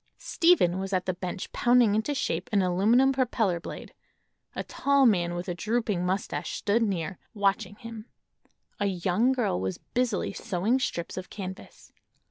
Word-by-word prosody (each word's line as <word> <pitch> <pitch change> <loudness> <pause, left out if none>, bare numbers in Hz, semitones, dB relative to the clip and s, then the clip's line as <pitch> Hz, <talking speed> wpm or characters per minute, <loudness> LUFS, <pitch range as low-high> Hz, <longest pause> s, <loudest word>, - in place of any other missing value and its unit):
Stephen 260 - +3
was 195 +1 -4
at 185 -1 0
the 185 - 0
bench 180 +1 -5
pounding 240 -3 +4
into 220 +7 0
shape 250 - -2
an 200 -3 +3
aluminum 215 +9 +4
propeller 225 -8 +1
blade; - - -9 0.6
a - - -3
tall 280 -1 +2
man 175 -6 +2
with 175 +1 -5
a 175 - -1
drooping 210 -1 -1
mustache 190 +3 -2
stood 215 +3 +1
near, 190 -4 -2 0.2
watching 200 0 0
him. 230 +1 -9 0.7
A 205 - +1
young 190 +6 +1
girl 235 - 0
was 95 -1 -2
busily 240 -6 -1
sewing 200 +8 0
strips 170 -10 -3
of 185 - -6
canvas. 190 -2 -9
200 Hz, 155 wpm, -27 LUFS, 180-235 Hz, 0.7 s, pounding